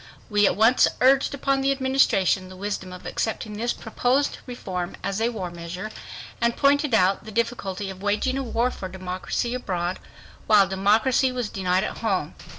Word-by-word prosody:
We 205 -1 +4
at - - +1
once 225 +4 +5
urged 270 +2 +4
upon 275 0 0
the 270 +1 +2
Administration 260 -9 +2
the 185 - -11
wisdom 190 -1 -4
of 180 0 -10
accepting 220 -1 -3
this 235 +3 -1
proposed 250 +5 0
reform 185 -7 -5
as 200 +2 -2
a 230 - +2
war 190 -7 -5
measure, 175 +4 -6 0.5
and 235 0 +1
pointed 285 -2 +3
out 190 -1 +3
the 220 - -8
difficulty 205 -4 -2
of 190 0 -11
waging 210 +6 0
a 270 - -1
war 240 0 0
for 185 - -7
democracy 185 +5 -3
abroad 185 -7 -2 0.5
while 205 -3 +6
democracy 215 +7 +2
was 245 -4 -3
denied 185 0 +1
at - - -4
home. - - -1
215 Hz, 170 wpm, -24 LUFS, 190-250 Hz, 0.5 s, while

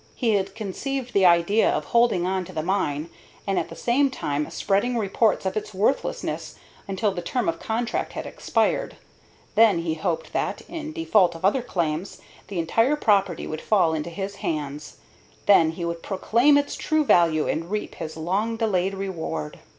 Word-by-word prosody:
He 230 -4 +1
had 195 -1 -1
conceived 245 +5 -4
the 195 -2 +5
idea 175 +5 +4
of - - -1
holding 235 -7 +3
on 185 0 0
to - - -10
the 155 - -3
mine, 165 -4 -1 0.3
and 195 -1 +1
at - - -4
the - - -9
same 270 +4 +2
time 150 - -2
spreading 220 +5 0
reports 210 -1 +1
of 190 - -1
its 215 -1 -4
worthlessness 215 +8 -1 0.3
until 200 +2 0
the 180 -2 -4
term 240 +8 -2
of 165 0 -1
contract 230 +1 -2
had - - -5
expired, - - -1 0.6
when 215 -7 +4
he 165 -2 -1
hoped 165 0 -3
that, - - -1
in 315 -2 -6
default 215 - +2
of 165 - -4
other 230 +7 +3
claims, 170 -6 -3 0.3
the 195 -1 -6
entire 225 - +2
property 200 - +1
would 155 0 -5
fall 185 -7 +3
into 160 +1 -3
his 195 +3 -5
hands. 150 -2 -4 0.5
Then 165 -5 +5
he 170 +1 -4
would 170 0 -3
proclaim 235 - +3
its 285 0 -1
true 310 -1 +1
value 165 - +4
and 165 +2 -2
reap 210 +1 -3
his 160 0 -7
long 200 +8 -1
delayed 195 -4 0
reward. 175 - -4
195 Hz, 175 wpm, -24 LUFS, 170-225 Hz, 0.6 s, the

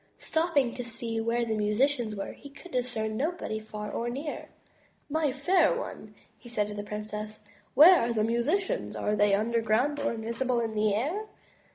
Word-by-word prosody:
Stopping 320 -7 +1
to 250 - -5
see 230 -1 -4
where 235 +1 0
the 225 - -1
musicians 220 +2 +1
were, 195 - -4
he 285 - -12
could 310 +6 -14
discern 225 -4 -2
no 305 +8 +1
body 220 -11 -4
far 210 -1 -7
or 235 +1 -2
near. 280 +5 -5 0.6
My 310 -2 +1
fair 340 - +3
one,'' - - -7 0.3
said 215 -3 -1
he - - -5
to 205 - -4
the 205 - -12
princess, 215 0 -6 0.3
"where 335 +6 +9
are 235 +1 0
the 220 -2 +1
musi 235 - +2
cians? 400 +5 -3
Are 210 - 0
they 205 -1 +4
underground 230 +6 +1
or 285 - 0
invisible 235 +3 -1
in 225 -2 -2
the 210 -1 +2
air?" 335 - -2
235 Hz, 185 wpm, -29 LUFS, 215-285 Hz, 0.6 s, where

